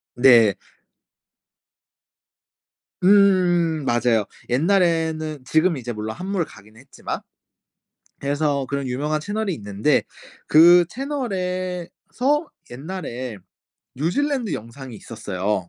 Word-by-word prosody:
네. 120 -5 +6 2.5
음 180 -5 +4
맞아요. 120 -4 +1 0.2
옛날에는 160 -1 +1
지금 160 +5 +2
이제 125 -2 -5
물론 110 0 -5
한물가기는 160 - -5
했지만 135 - -6 1.0
그래서 145 -1 0
그런 140 -1 -2
유명한 150 +5 -1
채널이 205 +3 -2
있는데 105 +4 0 0.4
그 175 +3 +7
채널에서 235 - -3 0.2
옛날에 130 - -6 0.6
뉴질랜드 235 - -1
영상이 120 +2 -9
있었어요. 100 -4 -4
155 Hz, 215 characters per minute, -22 LUFS, 120-185 Hz, 2.5 s, 그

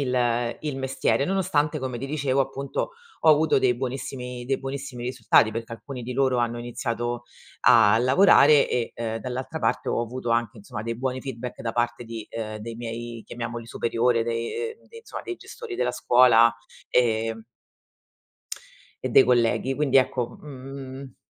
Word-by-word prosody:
il 120 -3 0
il 150 -3 -3
mestiere, 135 +1 0
nonostante, 155 -6 +1
come 130 -2 -4
ti 135 - -4
dicevo, 140 -2 0
appunto, 135 - -2 0.3
ho 160 - +6
avuto 155 0 +4
dei 130 -2 +3
buonissimi 125 -1 -5
dei 135 +1 0
buonissimi 135 -2 -6
risultati, 120 -3 +3
perché 115 +1 -5
alcuni 125 +2 -7
di 125 +2 -5
loro 130 0 +2
hanno 120 0 0
iniziato 120 0 -3 0.4
a 110 -1 +6
lavorare, 140 +2 +6
e, 120 -2 -1
ehm, 115 -1 -3
dall'altra 130 +6 -5
parte, - - 0
ho - - 0
avuto 120 +1 -4
anche, 115 0 0
insomma, 105 +1 -7
dei 115 +1 -3
buoni 130 +1 -2
feedback 125 -2 -6
da 115 - -2
parte 120 0 -1
di 115 -1 -7
ehm, 110 -1 -5
dei 115 +2 -7
miei 115 0 -6
chiamiamoli 120 -1 -6
superiori 115 0 +1
dei 115 - -3
uhm, - - -24
de 460 - -14
insomma 455 - -8
dei 365 - -5
gestori 465 -1 -9
della - - 0
scuola, 115 -2 +5 0.4
ehm 115 -2 +1 1.6
E - - 0
dei - - +7
colleghi. 125 +2 +2
Quindi 135 -2 +3
ecco, 125 -2 0
mhmm 135 -1 -9
125 Hz, 160 wpm, -25 LUFS, 115-135 Hz, 1.6 s, dei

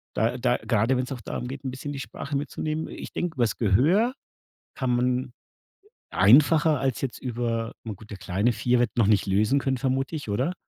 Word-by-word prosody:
da 115 +3 +1
da 125 0 +2
grade 115 +3 +1
wenn's 130 +2 -2
auch 125 -3 -5
darum 125 - -5
geht, 135 +2 -7
'n 130 - -2
bisschen 140 +3 -6
die 135 - -5
Sprache 140 +2 -6
mitzunehmen 155 +2 -3
ich - - -9
denke 175 -3 -2
übers 120 -4 +1
Gehör 155 - +3 0.6
kann 130 -3 0
man 125 +1 0 0.8
einfacher 145 - +5
als 135 -3 -1
jetzt 135 -3 -4
über 115 -2 -2
na 110 -2 -5
gut, 105 +3 -15
der 100 - -6
Kleine, 100 +6 0
4, 120 +3 +1
wird 120 - +1
noch 110 -4 +4
nicht 105 -2 +3
lesen 105 +8 +2
können, 135 -1 -1
vermute 135 +3 -1
ich, 145 -8 -6
oder? 130 - 0
125 Hz, 195 wpm, -26 LUFS, 115-140 Hz, 0.8 s, einfacher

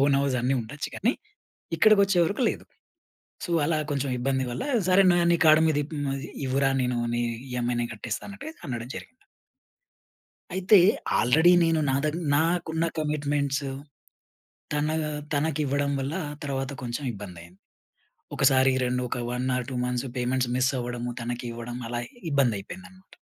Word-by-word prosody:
Own 140 - +3
house 140 -2 0
అన్నీ 130 +2 +2
ఉండొచ్చు 140 +6 -6
గాని 235 +6 +2 0.6
ఇక్కడికి 215 -2 +6
వచ్చేవరకు 195 +4 +1
లేదు. - - -7 0.8
సో, 175 - -5
అలా 160 +1 +1
కొంచెం 140 -1 -1
ఇబ్బంది 130 +1 0
వల్ల 120 - -3 0.3
సరే 195 +1 +6
ను 175 - +3
నీ - - +5
కార్డ్ 155 0 +7
మీద 155 -2 +1
ఇప్ 150 - -9 0.5
ఇవ్వురా 135 +1 +2
నేను 125 -1 0 0.2
నీ 120 - 0 0.3
ఈఎ‌మ్ఐ 120 0 -1
నేను 120 - -3
కట్టేస్తా 110 0 -5
అన్నట్టుగా 250 +11 -8
అనడం 120 -2 -4
జరిగింది. - - -7 1.5
అయితే 190 +3 +5 0.4
ఆల్రెడీ 160 +9 +5
నేను 165 -1 +2
నా 135 - +2
దగ్ 155 +2 0 0.2
నాకున్న 165 +1 +1
కమిట్మెంట్స్ 145 -2 -1 1.1
తన 150 0 0 0.4
తనకివ్వడం 145 -1 0
వల్ల 135 +4 -3 0.3
తర్వాత 135 -1 -2
కొంచెం 120 +4 -4
ఇబ్బంది 95 -4 -9
అయింది. 85 +3 -17 0.8
ఒకసారి 135 -1 +4
2 125 0 0
ఒక - - -3
1 125 +1 -2
ఆర్ 125 - -3
2 130 - -4
మంత్స్ 125 +1 -2
పేమెంట్స్ 125 0 0
మిస్ 130 +1 +2
అవ్వడం, 120 0 -4 0.2
తనకి 120 +1 -4
ఇవ్వడం 120 +1 -6
అలా 120 0 -2 0.3
ఇబ్బంది 135 -7 +2
అయిపోయింది 180 - -9
అన్నమాట. 185 0 -20
140 Hz, 150 wpm, -26 LUFS, 125-160 Hz, 1.5 s, కార్డ్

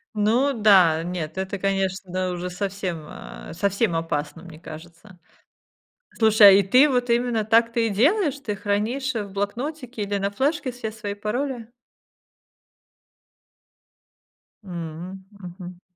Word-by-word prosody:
Ну 235 +7 +2
да. 190 -8 +5
Нет, 175 -1 -5
это, 190 +1 -3
конечно, 190 -1 -2
да, 185 0 -1
уже 180 +1 -4
совсем, 185 -4 -4
а, - - -10
совсем 200 -2 0
опасно, 165 0 -3
мне 165 -3 -12
кажется. 170 +4 -12 1.0
Слушай, 220 -2 +7
а - - +10
и 195 +1 +5
ты 255 +10 +5
вот 250 -2 0
именно 235 -2 +1
так 230 +2 +3
ты 230 -2 +1
и - - -1
делаешь, 285 - +2
ты 210 -7 -4
хранишь 220 +8 -1
в 205 -3 -5
блокнотике 245 +4 -4
или 200 0 -2
на 200 +1 -2
флешке 270 +3 -1
все 230 -3 -6
свои 210 -2 -5
пароли? 235 +3 -3 3.0
М. 175 +1 -7
Мгм. 180 -2 -11
200 Hz, 130 wpm, -23 LUFS, 180-230 Hz, 3.0 s, а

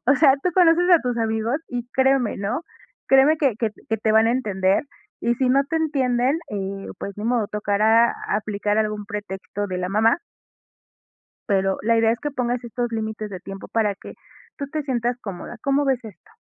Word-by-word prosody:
O 270 - +6
sea, 270 -2 +6
tú 360 - +1
conoces 350 -1 +5
a 345 -3 +7
tus 245 -2 -1
amigos 225 +2 0
y 245 -1 -4
créeme, 265 -3 +2
¿no?, 215 +11 -2 0.5
créeme 270 +4 +6
que 275 -7 +2
que 225 -3 0 0.2
que 225 - +1
te 215 0 0
van 220 +1 +5
a 230 - +3
entender, 195 -2 +1 0.4
y 235 - +1
si 255 -1 +1
no 275 +2 +3
te 325 +4 -2
entienden, 270 -3 +1
eh, 195 -1 -4
pues 200 - -5
ni 210 - -6
modo, 235 -3 +1
tocará 215 +3 +3 0.2
aplicar 210 0 -1
algún 210 -1 -1
pretexto 205 -1 -5
de 185 -2 -4
la 180 0 -2
mamá. 220 - +3 1.3
Pero 195 -1 +1
la 230 +1 +3
idea 225 0 +4
es 235 - -4
que 295 - -3
pongas 245 -1 -1
estos 240 0 -3
límites 220 -1 -4
de 185 -2 -7
tiempo 195 +1 -9
para 215 -3 +1
que - - -11 0.4
tú 280 - -3
te 305 +1 -3
sientas 245 -3 -1
cómoda. 200 +4 -7
¿Cómo 280 +1 +2
ves 265 -3 +1
esto? 220 - -13
230 Hz, 195 wpm, -23 LUFS, 210-265 Hz, 1.3 s, a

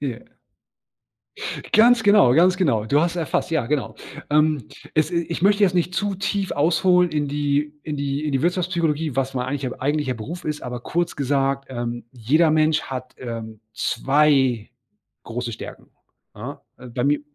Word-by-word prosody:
Ja. 130 -5 -6 1.4
Ganz 230 +2 +6
genau, 200 - +6
ganz 180 +6 +4
genau. 135 - +1
Du 145 +6 +2
hast 170 +1 +1
es - - -8
erfasst, 165 -1 -1
ja 160 -7 0
genau. 135 -5 -1 0.4
Ähm, 150 -4 +2 0.3
es 155 +1 +2
i 170 -1 -1
ich 170 - -4
möchte 205 +1 +4
jetzt 185 -2 +4
nicht 180 0 0
zu 205 0 0
tief 195 0 -2
ausholen 180 +4 +3
in 150 -2 -1
die 145 +1 -1
in 150 -1 -4
die 140 +1 -2
in 150 - -2
die 135 +1 0
Wirtschaftspsychologie, 170 -5 0
was 135 0 -1
mein 125 0 -2
eigentlich 135 0 -2
mein - - -10
eigentlicher 145 -1 0
Beruf 155 +11 -7
ist, 150 -1 -3
aber 125 -1 -5
kurz 175 +7 -2
gesagt, 135 0 0
ähm, 120 -2 -4
jeder 145 +8 +2
Mensch 155 0 +3
hat, 130 -1 -7
ähm, 115 -3 -7
2 130 -2 +2 0.5
große 120 0 -4
Stärken, - - -9 0.4
ja? - - -8 0.2
Also, 125 -1 -12
bei 125 - -1
mir 145 +1 +2
145 Hz, 175 wpm, -22 LUFS, 130-170 Hz, 1.4 s, Ganz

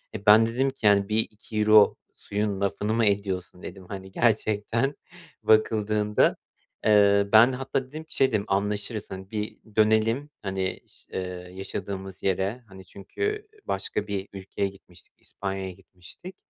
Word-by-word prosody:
E, 105 - -7
ben 110 +2 +8
dedim 130 +4 0
ki, 130 -5 -8
yani, 100 0 +4
bir 110 +1 +1
€2 110 -1 +3 0.2
suyun 100 -1 -3
lafını 105 +2 -1
mı 115 -1 +2
ediyorsun, 95 -3 -1
dedim. 95 0 -9
Hani, 95 -1 -7
gerçekten 115 +4 +1 0.5
bakıldığında. 105 -1 +3 0.5
Eee, 100 -1 +5
ben 115 +4 +8
hatta 135 0 -2
dedim 155 +4 -8
ki 160 - -11
şey 135 - +5
dedim, 105 -4 0
anlaşırız, 105 +2 -1
hani, 95 +1 -8
bir 105 -1 -4 0.2
dönelim, 110 +6 +3
hani, 95 -2 -3
ş - - -20
eee, 90 -1 -5
yaşadığımız 95 0 -6
yere, 100 +6 -1
hani, 95 -1 -13
çünkü 420 - -4 0.2
başka 105 - -2
bir 100 -1 -3
ülkeye 100 +1 -3
gitmiştik, 90 -2 -19
İspanya'ya 95 -1 -5
gitmiştik. 95 - -13
105 Hz, 140 wpm, -26 LUFS, 95-110 Hz, 0.5 s, ben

